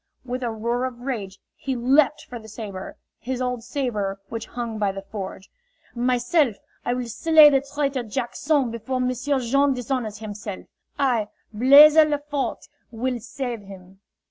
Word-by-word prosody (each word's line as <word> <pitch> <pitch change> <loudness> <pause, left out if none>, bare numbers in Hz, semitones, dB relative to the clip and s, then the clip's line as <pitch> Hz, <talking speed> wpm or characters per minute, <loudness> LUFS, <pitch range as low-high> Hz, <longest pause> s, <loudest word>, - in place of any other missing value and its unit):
With 250 +1 -4
a 240 - -1
roar 235 +3 -1
of 245 -2 -6
rage 215 -7 -4 0.2
he 265 -1 -3
leaped 270 +5 +3
for 245 - -8
the 220 - -13
saber 205 -3 -7 0.2
his 255 +1 -4
old 250 -2 -2
saber 225 -7 -2
which 230 -1 -5
hung 235 -3 -5
by 205 -2 +1
the 195 0 -7
forge. 195 -1 -7 0.5
"Myself, 245 - +2 0.3
I 245 - 0
will 250 -1 -3
slay 305 +5 +6
the 270 -1 +3
traitor 275 -1 -2
Jack 240 +2 -4
son 285 -5 +1
before 235 +3 -3
M'sieu' 255 +2 0
Jean 275 +3 +2
dishonors 245 -4 -3
himself! 205 -2 -7 0.3
I, 245 -7 +1 0.3
Blaise 280 +7 +8
Lefort, 295 -2 +1 0.2
will 245 +2 -2
save 245 -1 -5
him." 190 -1 -13
245 Hz, 155 wpm, -24 LUFS, 220-270 Hz, 0.5 s, Blaise